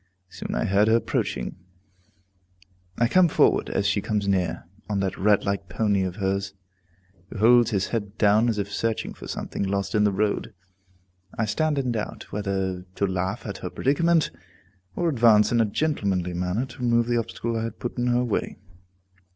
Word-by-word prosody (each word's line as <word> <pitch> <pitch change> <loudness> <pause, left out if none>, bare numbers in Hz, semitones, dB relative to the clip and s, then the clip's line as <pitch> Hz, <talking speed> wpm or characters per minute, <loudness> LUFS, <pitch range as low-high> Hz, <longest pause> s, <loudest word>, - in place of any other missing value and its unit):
Soon - - -6
I - - 0
heard 100 +2 +3
her 110 - +5
approaching. 90 - -2 1.4
I 120 - +3
come 185 +6 +5
forward - - +2
as 100 - -1
she 100 0 +1
comes 105 -1 -1
near, 95 -3 0 0.3
on 100 -2 0
that 95 -1 -1
rat 105 +1 +2
like 100 -2 -2
pony 100 0 +1
of 95 -1 -2
hers, 100 0 -2 0.7
who - - -8
holds 120 +2 +5
his 100 -5 -1
head 105 -2 -4
down 110 +3 +4
as 110 - -1
if 100 -1 -3
searching 115 -1 -2
for - - -11
something - - -5
lost 100 0 -1
in 105 - +3
the 105 - +3
road. 105 +2 -1 0.8
I 110 - +1
stand 150 +8 0
in 130 -3 0
doubt 110 -2 -5
whether 95 -3 -2
to 100 - +1
laugh 95 0 -2
at - - -5
her - - -5
predicament, 165 +4 +2 0.6
or 175 - 0
advance 115 -7 +4
in 120 -1 +3
a - - +3
gentlemanly 100 - -1
manner 90 +7 -1
to 130 - -14
remove 120 -1 +2
the 120 0 0
obstacle 115 0 -3
I 115 0 -1
had 115 -1 -6
put 120 0 -5
in 120 - 0
her 120 0 +2
way. 120 -4 -2
105 Hz, 185 wpm, -25 LUFS, 100-120 Hz, 1.4 s, her